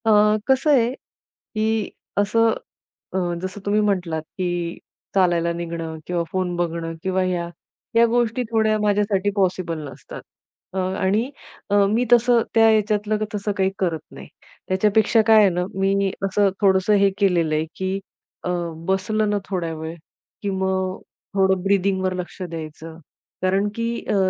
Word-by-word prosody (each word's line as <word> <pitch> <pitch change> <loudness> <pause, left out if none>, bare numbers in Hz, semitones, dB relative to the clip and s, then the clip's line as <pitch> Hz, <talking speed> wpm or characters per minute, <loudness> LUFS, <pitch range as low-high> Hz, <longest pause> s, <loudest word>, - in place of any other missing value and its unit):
अ, 210 -1 +5
कसं 265 +3 +3
आहे 245 -4 +4
की 220 -4 -4 0.3
असं 225 +2 +3 0.6
अ, - - 0 0.2
जसं 185 +2 -5
तुम्ही 205 +1 +2
म्हटलात, 180 -6 0
की 175 0 -3 0.4
चालायला 175 -3 +3
निघणं 165 -1 -5
किंवा 175 -1 0
फोन 185 -2 -1
बघणं 165 -1 -2
किंवा 190 0 +1
ह्या, 180 -2 -1 0.5
ह्या 230 0 +7
गोष्टी 240 +1 +1
थोड्या 220 -1 +2
माझ्यासाठी 205 -1 +1
पॉसिबल 185 -4 0
नसतात. - - -10 0.5
अ, - - -4
आणि 190 +5 0 0.4
अ, 205 - +2
मी 230 +4 +2
तसं 240 0 +5
त्या 225 0 +6
ह्याच्यातलं 215 0 +2 0.2
तसं 205 0 -1
काही 190 0 +2
करत 170 -4 0
नाही. - - -10 0.4
त्याच्यापेक्षा 210 +4 +3
काय 220 -1 +7
आहे 200 - +6
ना, 180 0 0
मी 195 0 +1 0.2
असं 200 +1 +3
थोडंसं 190 +1 +4
हे 200 - +5
केलेलं 175 -6 +2
आहे 155 +1 0
की 190 +1 -2 0.4
अ, - - -2 0.4
बसलं 210 +3 +1
ना 205 - +1
थोड्या 175 -4 -2
वेळ 160 +1 -6 0.5
की 205 - -2
मग 190 -1 -1 0.4
थोडं 190 -1 +2
ब्रिदिंगवर 190 -1 +1
लक्ष 180 +1 -7
द्यायचं 160 -2 -7 0.4
कारण 190 +2 +2
की 230 0 -1 0.2
अ, - - +2
195 Hz, 145 wpm, -22 LUFS, 180-210 Hz, 0.6 s, ह्या